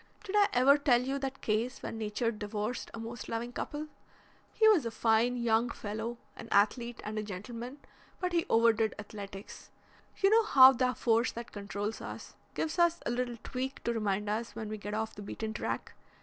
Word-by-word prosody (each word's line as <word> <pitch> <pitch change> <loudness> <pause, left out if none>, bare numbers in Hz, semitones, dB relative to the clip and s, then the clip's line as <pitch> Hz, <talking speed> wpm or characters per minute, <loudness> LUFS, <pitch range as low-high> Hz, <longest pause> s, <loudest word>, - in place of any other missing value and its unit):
Did 415 -1 -4
I 410 -1 +6
ever 275 +4 +6
tell 255 -4 +4
you 270 +2 -2
that 270 0 -5
case 230 +4 -1
where - - -3
Nature 225 +1 -1
divorced 210 +2 -4
a - - -8
most 230 +2 -7
loving 235 +2 -3
couple? 295 +4 -4 0.7
He 440 - +4
was 415 -8 +6
a 230 - -2
fine 230 +2 +2
young 235 0 +2
fellow, 220 +2 -4 0.2
an - - -9
athlete 235 +4 +2
and 215 +1 -3
a - - -1
gentleman, 230 +6 -7 0.4
but 365 -1 -2
he 340 -1 +1
overdid 225 -1 +3
athletics. 205 -1 -9 0.5
You 390 0 +3
know 450 +1 +6
how 265 -8 +9
the 255 0 +1
force 230 +1 +2
that 235 0 -7
controls 205 +1 -4
us - - -8 0.2
gives 320 +3 -2
us 345 0 +4
a - - 0
little 245 -1 -2
tweak 265 +1 -4
to 235 - 0
remind 210 -2 -1
us 215 +1 -2
when 220 -2 -5
we 215 0 -5
get 205 +1 -4
off 220 0 -2
the 205 - -9
beaten 220 +2 -5
track. 215 - -4
230 Hz, 190 wpm, -31 LUFS, 215-255 Hz, 0.7 s, how